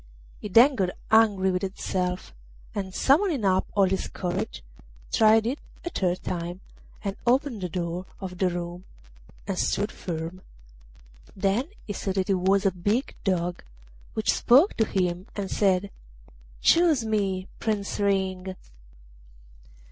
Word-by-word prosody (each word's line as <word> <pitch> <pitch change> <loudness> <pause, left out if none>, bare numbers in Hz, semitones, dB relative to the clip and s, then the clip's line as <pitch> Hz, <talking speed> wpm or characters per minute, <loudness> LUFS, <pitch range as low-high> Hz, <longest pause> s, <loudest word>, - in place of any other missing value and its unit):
He - - -5
then 240 +8 +7
got 190 -7 0 0.2
angry 205 -4 +4
with 180 0 -1
himself, 185 - -3 0.4
and, 195 -2 -3
summoning 280 - +2
up 185 -1 +2
all 200 - +5
his 190 0 0
courage, 175 - -4 0.5
tried 220 0 +5
it 260 +5 -1 0.3
a 345 - -3
third 180 -1 -1
time, 175 0 -4 0.4
and 200 -1 -2
opened 250 -3 +2
the 180 - -3
door 175 +1 -3
of 180 -2 -7
the 185 - +3
room 175 +1 -5 0.6
and 195 -2 -2
stood 205 +1 0
firm. 170 +1 -5 0.9
Then 195 +6 +1 0.2
he 205 - -4
saw 195 0 -3
that 190 +1 0
it - - +5
was 190 +2 +2
a 195 - +4
big 205 +9 -1
Dog, 180 -2 0 0.5
which 220 - +2
spoke 280 - +5
to 220 - +3
him 180 -2 -1
and 200 -2 -4
said: 195 -1 +2 0.7
'Choose 325 -8 +4
me, 195 -3 -1
Prince 210 -3 -2
Ring. 190 -2 0
195 Hz, 140 wpm, -26 LUFS, 180-215 Hz, 0.9 s, then